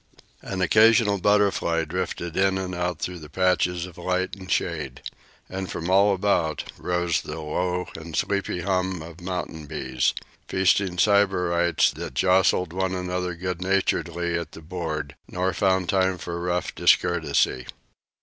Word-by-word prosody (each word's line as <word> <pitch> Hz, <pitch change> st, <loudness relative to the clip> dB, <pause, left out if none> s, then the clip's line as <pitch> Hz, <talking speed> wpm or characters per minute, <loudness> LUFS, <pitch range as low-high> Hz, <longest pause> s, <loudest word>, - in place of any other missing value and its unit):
An 95 Hz, -1 st, -3 dB
occasional 110 Hz, 0 st, +5 dB
butterfly 100 Hz, -5 st, +2 dB
drifted 85 Hz, 0 st, -4 dB
in 95 Hz, 0 st, +2 dB
and 95 Hz, -1 st, -4 dB
out 90 Hz, 0 st, -2 dB
through 90 Hz, -1 st, -4 dB
the 75 Hz, -2 st, -11 dB
patches 90 Hz, +1 st, +1 dB
of 90 Hz, -2 st, -12 dB
light 95 Hz, +1 st, -1 dB
and 95 Hz, -1 st, -9 dB
shade. 75 Hz, -7 st, -2 dB, 0.4 s
And 95 Hz, 0 st, -5 dB
from 85 Hz, +2 st, -3 dB
all 100 Hz, +1 st, +5 dB
about 90 Hz, -5 st, 0 dB, 0.2 s
rose 90 Hz, -1 st, 0 dB
the 75 Hz, +2 st, -6 dB
low 90 Hz, +4 st, -1 dB
and 80 Hz, 0 st, -7 dB
sleepy 100 Hz, -3 st, -1 dB
hum 95 Hz, -2 st, -1 dB
of 85 Hz, +1 st, -11 dB
mountain 85 Hz, -4 st, -5 dB
bees 65 Hz, -2 st, -1 dB, 0.3 s
feasting 95 Hz, -1 st, +2 dB
Sybarites 90 Hz, -4 st, +3 dB
that -, -, -7 dB
jostled 90 Hz, +1 st, +3 dB
one 95 Hz, 0 st, -1 dB
another 90 Hz, -1 st, -2 dB
good 90 Hz, 0 st, -4 dB
naturedly 90 Hz, -2 st, 0 dB
at 85 Hz, -3 st, -7 dB
the -, -, -10 dB
board, 80 Hz, -4 st, -4 dB
nor 95 Hz, +1 st, -1 dB
found 95 Hz, -3 st, +1 dB
time 95 Hz, -2 st, +2 dB
for 85 Hz, 0 st, -5 dB
rough 90 Hz, 0 st, -1 dB
discourtesy. 80 Hz, -7 st, +2 dB
90 Hz, 145 wpm, -25 LUFS, 85-95 Hz, 0.4 s, occasional